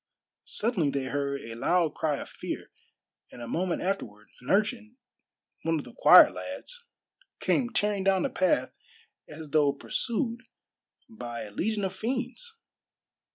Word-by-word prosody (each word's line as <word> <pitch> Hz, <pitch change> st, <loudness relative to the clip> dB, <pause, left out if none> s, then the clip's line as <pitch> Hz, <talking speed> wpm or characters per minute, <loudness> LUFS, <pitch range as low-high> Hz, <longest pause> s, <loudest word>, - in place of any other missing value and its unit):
Suddenly 205 Hz, -, +1 dB
they 140 Hz, -1 st, -1 dB
heard 140 Hz, 0 st, -2 dB
a 115 Hz, -, -8 dB
loud 160 Hz, +7 st, +1 dB
cry 150 Hz, -3 st, 0 dB
of -, -, -7 dB
fear, -, -, -6 dB, 0.6 s
and -, -, -11 dB
a 120 Hz, -, -6 dB
moment 175 Hz, +4 st, -1 dB
afterward 105 Hz, -, -3 dB
an 125 Hz, -, -10 dB
urchin 220 Hz, +3 st, +1 dB, 0.6 s
one 165 Hz, 0 st, +1 dB
of 145 Hz, -, -5 dB
the -, -, -12 dB
choir -, -, +9 dB
lads 485 Hz, -1 st, -7 dB, 0.5 s
came 245 Hz, -3 st, +1 dB
tearing 205 Hz, -4 st, 0 dB
down 190 Hz, -1 st, +3 dB
the -, -, 0 dB
path 185 Hz, -1 st, +1 dB, 0.6 s
as 155 Hz, 0 st, -9 dB
though 145 Hz, -2 st, +4 dB
pursued 230 Hz, -, -2 dB, 0.7 s
by 120 Hz, -, -6 dB
a 105 Hz, -, -9 dB
legion 210 Hz, -, -1 dB
of 190 Hz, -, -3 dB
fiends. 255 Hz, -, -3 dB
185 Hz, 145 wpm, -28 LUFS, 140-225 Hz, 0.7 s, choir